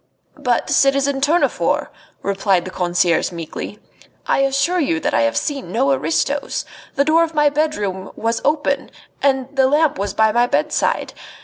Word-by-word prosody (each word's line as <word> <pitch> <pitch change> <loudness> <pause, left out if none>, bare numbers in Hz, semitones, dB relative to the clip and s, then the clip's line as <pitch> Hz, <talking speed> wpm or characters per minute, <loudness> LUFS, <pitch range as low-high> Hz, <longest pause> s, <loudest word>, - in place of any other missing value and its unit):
"But, - - 0
citizen 275 0 +2
Tournefort," 315 +5 +1 0.3
replied 195 -2 +1
the 185 - -6
concierge 175 -1 +1
meekly, 170 +4 -7 0.5
"I - - +1
assure 275 +6 +1
you 215 - 0
that - - -2
I - - +3
have 115 0 +1
seen 275 - -3
no 140 -6 +2
aristos. 160 - -1 0.3
The 280 - +2
door 320 +2 +4
of 325 -1 -4
my 295 -1 +4
bedroom 205 -11 -2
was 230 +1 -1
open, 290 -2 0 0.3
and 270 0 0
the 265 -1 +4
lamp 295 -3 +2
was 200 0 -3
by 220 0 +3
my 240 +2 +2
bedside. - - 0
265 Hz, 155 wpm, -19 LUFS, 190-285 Hz, 0.5 s, door